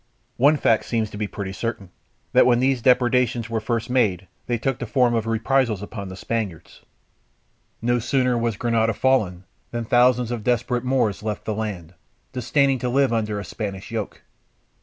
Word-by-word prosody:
One 145 +5 +5
fact 115 -5 +2
seems 110 -3 -1
to - - -8
be 105 - -1
pretty 100 -1 -6
certain, 100 -4 -4 0.4
that - - +6
when 120 -1 +4
these 130 -1 +1
depredations 125 -2 +2
were 115 - 0
first 115 0 -2
made, 105 -8 +1 0.2
they 120 - 0
took 135 +2 -2
the 120 - -4
form 125 0 +2
of 115 -1 -1
reprisals 115 -2 +1
upon 100 -1 -7
the 95 - -8
Spaniards. 105 -5 -4 1.0
No 120 +1 +2
sooner 125 +1 +1
was 115 -3 -1
Granada 115 -1 +1
fallen, 100 -10 +1 0.3
than 120 -1 -4
thousands 125 0 +3
of 120 -3 -4
desperate 120 +1 0
Moors 125 -6 0
left 105 -1 -4
the 110 - -1
land, 100 -6 -5 0.4
disdaining 135 +2 +1
to 125 - -2
live 135 -1 +2
under 105 -2 -1
a 100 - -6
Spanish 100 0 -6
yoke. 110 -3 -5
115 Hz, 175 wpm, -23 LUFS, 105-125 Hz, 1.0 s, that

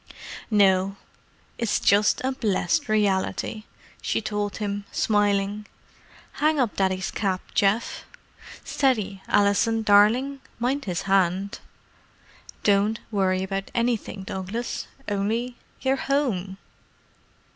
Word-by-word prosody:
"No; 195 -2 +3 0.6
it's 230 -3 +1
just 205 +1 +3
a 260 - +1
blessed 260 - 0
reality," 210 +1 0 0.4
she - - 0
told 210 -2 -3
him, 205 -1 -3
smiling. 205 0 +1 0.7
"Hang 305 0 +3
up 240 -5 +1
Daddy's 190 -1 0
cap, 190 -3 -1
Geoff: 205 +3 +1 0.6
steady, 215 -8 0
Alison, 220 +3 +2
darling—mind 250 +5 +2
his 180 -4 -2
hand. 195 0 +1 1.0
Don't 205 +2 +3
worry 190 -2 +1
about 195 0 -3
anything, 230 -4 -1
Douglas—only—you're 230 +5 -3
home." 225 -11 -1
205 Hz, 90 wpm, -25 LUFS, 195-235 Hz, 1.0 s, No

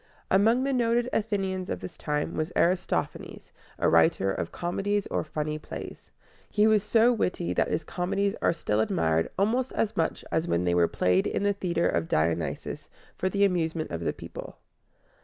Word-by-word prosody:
Among 225 +6 +4
the 275 0 0
noted 240 0 +2
Athenians 195 -4 -1
of - - -2
this 180 - -8
time 150 -1 -2
was 155 +2 -2
Aristophanes, 180 +2 -1 0.3
a - - +1
writer 85 +4 +4
of - - -3
comedies 195 +4 -1
or - - 0
funny 155 0 -3
plays. - - -9 0.4
He 210 0 +3
was 215 -1 +4
so 225 +4 +4
witty 180 -6 -1
that - - +1
his 165 - -1
comedies 195 +5 -1
are - - +3
still 110 -10 -1
admired 80 -6 +1
almost 240 +6 +1
as 220 0 0
much 165 - -1
as 160 +1 0
when 85 +1 +1
they 90 -1 +1
were 85 -1 +4
played 90 +2 +1
in - - -1
the 205 0 +2
Theater 175 -4 0
of 80 -1 0
Dionysus 80 +1 -1 0.3
for 185 - -1
the 200 +1 +3
amusement 165 -4 -1
of 85 - -3
the 85 - 0
people. - - -9
180 Hz, 175 wpm, -27 LUFS, 150-205 Hz, 0.4 s, Among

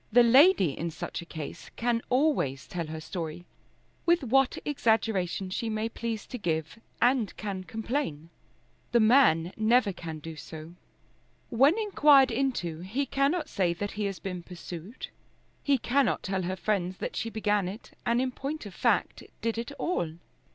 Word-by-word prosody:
The 240 +2 +7
lady 260 - +6
in 170 - -3
such 175 +2 -5
a 170 - -11
case 155 -4 -7
can 235 0 0
always 250 - +1
tell 170 -3 -4
her 160 0 -5
story, 165 0 -6 0.6
with 340 -2 +3
what 265 +1 +3
exaggeration 220 -9 0
she 225 +4 -2
may 220 +1 -1
please 230 -2 -4
to 250 - -7
give, 160 +1 -2 0.2
and 245 -4 +2
can 195 -3 -4
complain. 220 - -3 0.6
The 235 - +6
man 215 - +5
never 220 -1 +3
can 165 -3 -7
do 160 +1 -8
so. 160 +1 -9 0.8
When 275 - +5
inquired 295 - +5
into, 225 -10 -1
he 215 +11 -2
cannot 290 +5 +1
say 180 - 0
that 205 +3 -3
he 210 0 -3
has 195 -2 -3
been 180 +2 -5
pursued. 175 +4 -8 0.5
He 280 -1 +3
cannot 260 0 +1
tell 190 0 -1
her 185 +1 -2
friends 185 -1 -1
that - - -4
she 230 - -2
began 210 -3 0
it, 200 +5 -8
and 235 +1 +2
in 255 0 0
point 280 +2 -5
of 200 - -8
fact - - +1 0.2
did 230 0 -1
it 235 +4 -5
all. 285 - -2
215 Hz, 165 wpm, -28 LUFS, 175-255 Hz, 0.8 s, The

